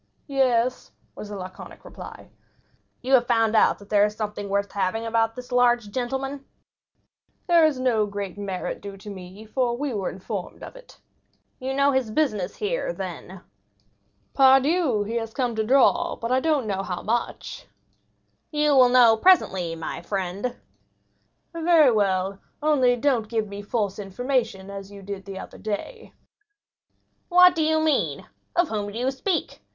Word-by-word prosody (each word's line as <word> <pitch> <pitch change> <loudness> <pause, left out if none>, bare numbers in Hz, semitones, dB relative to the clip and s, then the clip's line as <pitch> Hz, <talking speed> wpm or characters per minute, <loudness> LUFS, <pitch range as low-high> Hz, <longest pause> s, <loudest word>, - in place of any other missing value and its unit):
"Yes," 255 -3 0 0.2
was 210 - -9
the 205 - -6
laconic 185 0 -10
reply. - - -11 0.7
"You 260 +2 -1
have 245 -2 +5
found 225 -2 +2
out 215 - +4
that 200 0 -16
there 205 -1 +4
is 210 0 0
something 210 -2 -4
worth 200 0 -1
having 200 +3 -1
about 225 0 +1
this 250 0 -10
large 240 -3 +2
gentleman?" 270 +4 -3 1.0
"There 340 -2 +5
is 285 -4 -2
no 230 -5 +1
great 200 -2 -5
merit 200 -2 -4
due 200 -1 -8
to 205 +1 -9
me, 190 +2 -10
for 240 +1 -1
we 280 -1 -3
were 195 -4 -2
informed 190 0 -7
of - - -9
it." - - -15 0.6
"You 265 0 -3
know 280 +1 +3
his 260 -4 0
business 215 -7 -1
here, - - -2
then." - - -7 0.9
"Pardieu, 270 - +4
he 225 +3 -3
has 225 -1 -5
come 245 -4 -1
to 220 - 0
draw, 275 +8 +3
but 230 +1 -5
I 255 - +4
don't 295 -3 +1
know 195 -2 -2
how 180 -2 -5
much!" 235 +2 -3 0.8
"You 300 -1 +2
will 255 -2 +7
know 245 -3 +6
presently, 190 - +3
my 165 +1 -6
friend." 195 +5 -3 1.0
"Very 330 -4 +4
well, 195 -2 0 0.2
only 265 -5 +3
do 270 +4 +1
not 225 -4 -2
give 220 -2 -1
me 200 0 -7
false 205 -1 -2
information 200 -1 -2
as 195 0 -8
you 200 -1 -11
did 195 0 -7
the 195 -1 -7
other - - -9
day." 220 - -6 1.2
"What 360 0 +7
do 325 -2 0
you 315 0 +2
mean?—of 315 +2 -1
whom 205 -2 -3
do 215 - -7
you 255 +2 0
speak? 330 +7 -3
230 Hz, 160 wpm, -24 LUFS, 200-270 Hz, 1.2 s, will